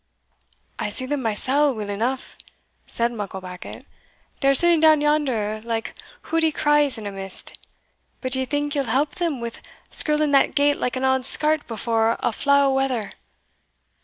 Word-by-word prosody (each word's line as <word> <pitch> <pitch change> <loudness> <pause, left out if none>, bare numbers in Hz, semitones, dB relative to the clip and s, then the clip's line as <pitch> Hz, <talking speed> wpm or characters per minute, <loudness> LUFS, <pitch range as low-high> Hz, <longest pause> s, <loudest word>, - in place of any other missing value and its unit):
"I - - -1
see 255 +5 -4
them 285 +1 -2
mysell 260 +5 +1
weel 210 -2 -5
eneugh," 240 +6 -3 0.5
said 235 0 0
Mucklebackit; 190 -5 -8 0.5
"they 275 - +1
are 275 - +5
sitting 345 +3 +4
down 310 -1 +6
yonder 260 -8 0
like 225 -1 -3 0.3
hoodie 325 -1 +1
craws 295 -3 +2
in 215 - -8
a 205 - -4
mist; 195 -1 -5 0.6
but 255 - -4
d'yo 260 0 +3
think 290 +1 -2
ye'll 280 -2 0
help 285 +4 0
them 325 -7 -1
wi' 235 0 -4 0.4
skirling 300 -1 +4
that 275 -1 +3
gate 285 0 +3
like 250 - -2
an 260 +1 -1
auld 265 -1 +1
skart 305 0 +1
before 225 0 0
a - - 0
flaw 280 +5 +3
o' 275 - +2
weather? 260 -5 -1
265 Hz, 160 wpm, -22 LUFS, 225-290 Hz, 0.6 s, down